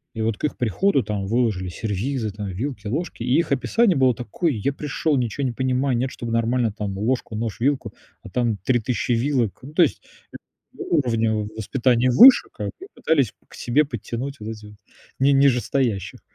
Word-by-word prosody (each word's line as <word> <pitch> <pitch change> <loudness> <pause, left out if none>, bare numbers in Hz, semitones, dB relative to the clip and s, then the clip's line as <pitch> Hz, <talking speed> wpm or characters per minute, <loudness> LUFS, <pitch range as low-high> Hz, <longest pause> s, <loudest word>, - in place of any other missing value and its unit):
и 110 - -3
вот 110 -1 -1
к - - -15
их 150 - -1
приходу 135 - +1
там 105 -2 -3
выложили 110 -5 0
сервизы: 110 +5 -3
там, 105 0 -6
вилки, 105 +3 -5
ложки. 145 +1 -3
И 125 +2 +2
их 170 - 0
описание 185 - +2
было 130 -2 +3
такое: 125 - -2
"Я 120 +5 -1
пришёл, 150 +1 -1
ничего 125 +2 -2
не 125 - 0
понимаю, 130 +1 0
нет, 130 +2 -1
чтобы 120 -1 -6
нормально 115 0 +1
там 100 -2 -5
ложку, 115 +1 -1
нож, 110 -1 -4
вилку, 135 +3 0 0.3
а - - -10
там 115 0 0
3000 120 +5 -1
вилок". 120 -3 0
Ну, 140 +4 -10
то 175 - +3
есть 155 - -1 0.7
у 170 - 0
уровня 115 -5 +1
воспитания 115 +4 0
выше 245 - +8
как - - -5
бы 380 - -10
и - - -21
пытались 140 -9 +1 0.2
к - - -18
себе 135 +6 +1
подтянуть 130 +1 -6
вот 105 +1 -5
этих, 105 -1 -10 0.5
ни 135 +1 +4
нижестоящих. 130 -6 +1
120 Hz, 185 wpm, -22 LUFS, 110-140 Hz, 0.7 s, выше